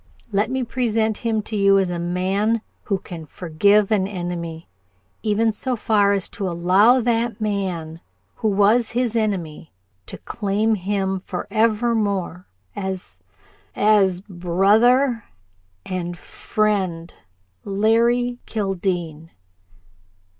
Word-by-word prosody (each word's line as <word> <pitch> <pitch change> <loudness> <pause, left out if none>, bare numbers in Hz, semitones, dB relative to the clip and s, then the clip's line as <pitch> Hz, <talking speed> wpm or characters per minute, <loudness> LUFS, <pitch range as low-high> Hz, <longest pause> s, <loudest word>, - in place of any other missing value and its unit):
"Let 205 +3 +1
me 260 0 -1
present 225 -3 0
him 225 -2 -1
to 215 - -5
you 195 -1 +4
as 190 -2 +1
a 175 - -3
man 190 +6 0 0.2
who 200 - 0
can 170 -4 -9
forgive 200 +7 +2
an 195 -3 +2
enemy 175 -4 -5 0.5
even 220 +1 +1
so 250 +4 -3
far 210 -3 +2
as 195 -2 0
to 195 -3 -3
allow 185 +9 +4
that 230 -1 0
man 185 -6 -3 0.4
who 220 - -1
was 210 +3 +3
his 240 -1 0
enemy 180 -8 -2 0.4
to - - -7
claim 210 +1 -1
him 195 -1 -1
forevermore 210 -2 -1 0.3
as 190 -2 -5 0.6
as 195 -4 +3
brother 210 +7 +2 0.6
and 175 -1 -4
friend, 190 -7 -2 0.5
Larry 235 +4 +1
Kildene!" 175 -6 -3
200 Hz, 110 wpm, -21 LUFS, 180-220 Hz, 0.6 s, you